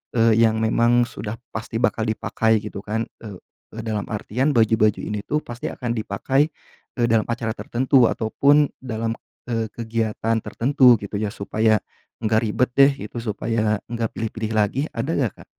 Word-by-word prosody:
eee, 115 -1 +5
yang 110 -1 +3
memang 120 +2 +3
sudah 110 0 -6 0.2
pasti 110 0 -4
bakal 110 - +1
dipakai, 110 0 +1
gitu, 105 -2 -7
kan, 110 +2 -2 0.2
eee, 100 -4 -8 0.4
dalam 110 -2 -2
artian, 125 +7 0
baju-baju 110 -3 +3
ini, 105 -1 -4
tuh, 150 - 0
pasti 120 -3 -6
akan 120 -2 -4
dipakai, 130 +7 +1 0.5
e 125 - -4
dalam 115 -1 +3
acara 115 -1 -2
tertentu 130 +1 +3
ataupun 140 +6 +3
dalam, 115 -3 -3 0.4
eee, 115 -1 -1
kegiatan 115 -1 -1
tertentu, 130 0 +4
gitu, 100 0 -6
ya, 105 0 -2
supaya 110 +2 +1 0.4
enggak 110 0 +2
ribet, 120 +4 +1
deh, 140 +1 +7 0.2
gitu, 120 - -10
supaya 110 -1 0
enggak 115 -2 -2
pilih-pilih 110 0 -3
lagi. 105 +5 +1
Ada 130 +7 -2
enggak, 125 -7 0
Kak? - - -29
115 Hz, 160 wpm, -22 LUFS, 110-120 Hz, 0.5 s, deh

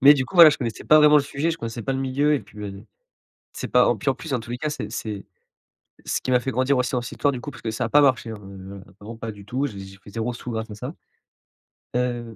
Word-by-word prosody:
Mais 145 +3 +9
du 130 -2 0
coup, 190 - -13
voilà, 170 -3 +11
je - - -1
connaissais 115 -4 -4
pas 155 - +6
vraiment 150 0 +7
le - - +1
sujet, 145 +3 -1
je 165 - -4
connaissais 115 0 -5
pas 135 - -1
le 135 - -2
milieu. 140 +3 +1
Et 140 - 0
puis, 105 - -16
bah, 105 -1 -5
d 100 +1 -11 0.7
c'est - - -5
pas - - +4
o - - +3
puis, - - -3
en - - 0
plus, 160 - -8
dans 125 -3 0
tous 120 - -11
les 120 - -3
cas, 155 +2 -2
c'est 150 - -5
c'est 105 -3 -5 0.8
ce - - -1
qui 130 - -3
m'a 125 - +5
fait 130 +1 -3
grandir 130 +2 +2
aussi 125 - 0
dans 125 -1 0
cette - - -7
histoire 145 -1 +1
du 125 - -5
coup, 145 - -6
parce - - -13
que 110 - -2
ça 120 +3 -2
a - - -1
pas 145 - +5
marché, 130 -4 +2
hein, - - -5
heu, 95 0 -10 0.2
vraiment 110 +3 -9
pas 115 -1 -5
du 100 -1 -13
tout. 130 +7 -1
J'ai 105 -7 -8
j'ai 95 0 -11
pris 100 - -15
0 115 +2 -2
sous 125 - -7
grâce 110 0 -4
à - - -6
ça. - - -6 1.0
Heu, 120 -2 -2
125 Hz, 305 wpm, -24 LUFS, 110-140 Hz, 1.0 s, voilà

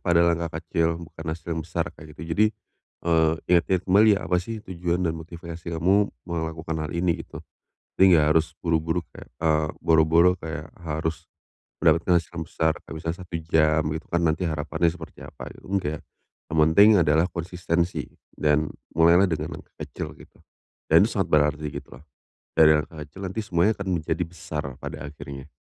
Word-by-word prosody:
pada 85 -1 +3
langkah 85 -1 0
kecil 85 0 0
bukan 80 0 -10
hasil 85 +1 -4
yang 80 - -2
besar 85 +1 -2
kayak 75 -1 -14
gitu. 80 0 -5
Jadi, 105 +5 +4 0.6
eee, 80 -2 +3 0.2
ingat-ingat 90 +1 +3
kembali 100 +4 +5
ya - - -3
apa 90 - +1
sih 110 +3 -6
tujuan 90 0 -2
dan 80 - +1
motivasi 85 +1 -9
kamu 95 +5 +2 0.2
melakukan 80 -1 -4
hal 75 - -4
ini 85 -1 0
gitu. - - -9 0.6
Jadi 95 -2 +7
nggak 75 - +4
harus 80 0 +1
buru-buru 80 +1 0
kayak - - -12
eee, 80 -1 +2 0.2
boro-boro 80 +2 +5
kayak 80 0 -6
harus 80 +1 -4 0.6
mendapatkan 85 +2 +4
hasil - - -24
yang 80 - -4
besar. 80 -1 +1
Kayak - - -8
misalnya 80 +2 -4
1 85 - -7
jam 80 -1 +3
gitu 80 - -6
kan 85 0 0
nanti 80 +2 +1
harapannya 80 +2 0
seperti 80 -3 -11
apa - - -11
gitu, - - -15
enggak. 80 -6 -1 0.5
Yang 80 0 -3
penting 100 +7 +6
adalah 80 +2 +3
konsistensi 85 0 -2 0.3
dan 75 0 +1 0.3
mulailah 85 +4 +6
dengan 80 -3 -3
langkah - - -19
kecil - - -7
gitu - - -18 0.5
dan - - +6
sangat - - -1
berarti 75 0 +2
gitu - - -8
loh. - - -19 0.5
Dari 75 -1 +6
langkah 75 +1 -5
kecil 95 +7 -9
nanti 95 +4 -3
semuanya 100 +1 +2
akan 100 - -4
menjadi 80 +3 -2
besar 75 -5 -6
pada 70 - -7
akhirnya. 70 -1 -9
80 Hz, 175 wpm, -25 LUFS, 80-85 Hz, 0.6 s, Jadi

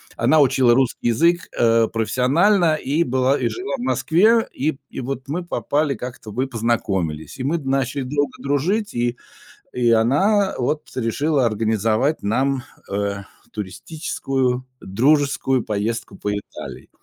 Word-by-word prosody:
Она 155 - +3
учила 130 -3 +4
русский 130 -2 +1
язык, 170 +9 +2
э, 115 -1 +4
профессионально 155 - +2
и 155 +3 0
была, 130 +1 +1
и - - +1
жила 370 -2 -5
в - - -7
Москве, 225 0 +3
и, 155 +4 0
п - - -19
и - - -7
вот 135 +1 -5
мы 170 +5 -3
попали 150 -3 -1
как-то, 125 -3 -8
мы 130 +5 -1
познакомились, 100 - -2
и - - -3
мы 160 +5 0
начали 135 -1 -1
друг 125 - -8 0.3
друга - - -12
дружить, 195 +10 0
и 120 0 -1 0.6
и 120 -2 +1
она 190 - +3
вот 150 +5 -2
решила 135 +4 +1
организовать 110 +5 +1
нам, 130 +5 0 0.3
э, 100 0 -2 0.3
туристическую 130 - -3 0.2
дружескую 135 +3 +1
поездку 110 +2 -3
по 105 - -3
Италии. 100 0 -7
130 Hz, 140 wpm, -21 LUFS, 115-155 Hz, 0.6 s, учила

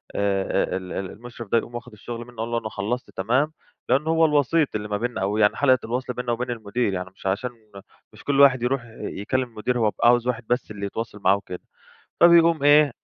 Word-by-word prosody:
آآ، 95 -2 0
ال 95 -1 -7
ال 95 -1 -4
المشرف 120 0 -10
ده 115 - +4
يقوم 120 +1 -3
واخد 120 -1 -8
الشغل 120 +3 -8
منّه 120 -2 -16
أقول 115 +1 -3
له: 120 - +1
"أنا 110 -1 -6
خلّصت 105 +2 -4
تمام." 130 +10 +1 0.4
لانه 150 +4 +2
هو 165 0 +4
الوسيط 150 -1 +2
اللي 105 0 -3
ما 105 0 -1
بيننا 120 -3 -3
أو 100 +2 0
يعني 105 -1 +3
حلقة 130 -3 +4
الوصل 125 +2 -3
بيننا 125 0 -3
وبين 120 +1 -2
المدير، 110 -1 -2
يعني 90 0 -4
مش - - -17
عشان 105 +6 -1 0.6
مش - - -15
كل 140 -1 0
واحد 130 -3 +6
يروح 125 0 0 0.2
يكلّم 130 +6 -2
المدير 120 +2 -2
هو 110 -2 +3
بيبقى 120 - +1
عاوز 120 0 +4
واحد 125 -1 -1
بس 125 -3 -1
اللي 100 -1 -5
يتواصل 105 +1 -5
معاه 95 +1 +4
وكده، 90 -3 -8 0.6
فبيقوم 170 -3 +6
إيه، 145 -2 +6
120 Hz, 215 wpm, -24 LUFS, 105-130 Hz, 0.6 s, واحد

